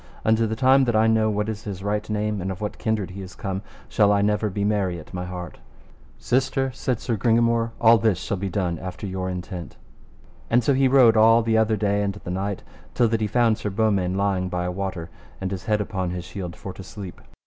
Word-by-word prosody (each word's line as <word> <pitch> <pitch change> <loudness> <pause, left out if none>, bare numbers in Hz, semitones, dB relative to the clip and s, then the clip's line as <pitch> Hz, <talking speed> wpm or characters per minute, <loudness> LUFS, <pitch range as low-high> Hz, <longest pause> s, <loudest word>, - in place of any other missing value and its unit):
Unto 110 +1 +3
the 110 - -2
time 130 +3 +4
that 120 -2 0
I 110 +1 +4
know 110 -1 +3
what 105 0 -1
is 110 -1 -5
his 100 -2 -6
right 105 +1 -2
name, 105 -1 -1
and 95 - -3
of 95 -1 -5
what 105 -1 -5
kindred 110 -4 -1
he 100 +2 -7
is 90 -1 -9
come, 95 -2 -4 0.3
shall 105 -1 +3
I 100 0 +3
never 105 +1 +1
be 100 +1 -2
merry 100 -4 0
at 80 - -14
my 90 0 -4
heart. 90 -2 -7 0.6
Sister, 130 +2 0
said 130 -2 -2
Sir 115 - -2
Gringamore, 115 +1 +2
all 115 0 +6
this 110 -5 +2
shall 100 - -3
be 95 +1 -3
done 90 -3 -2
after 90 +2 -6
your 95 -1 -3
intent. 90 -2 -6 0.7
And 120 +1 +3
so 140 - +3
he 135 0 +3
rode 125 -4 +6
all 115 +1 +6
the 110 0 +1
other 110 0 +2
day 100 -1 +1
and 100 -1 -1
the 95 -3 -7
night 100 +1 -3 0.3
till 120 -2 +3
that 115 0 0
he 105 - +1
found 115 0 +2
Sir 105 - -2
Beaumains 100 -3 +1
lying 95 -2 0
by 90 0 -2
a 90 - -1
water, 95 -3 -4 0.3
and 95 0 -3
his 95 -2 -5
head 105 -1 +1
upon 95 -3 -2
his 90 0 -5
shield, 90 -3 -6
for 95 - -8
to - - -10
sleep. 95 -1 -9
105 Hz, 235 wpm, -24 LUFS, 95-110 Hz, 0.7 s, all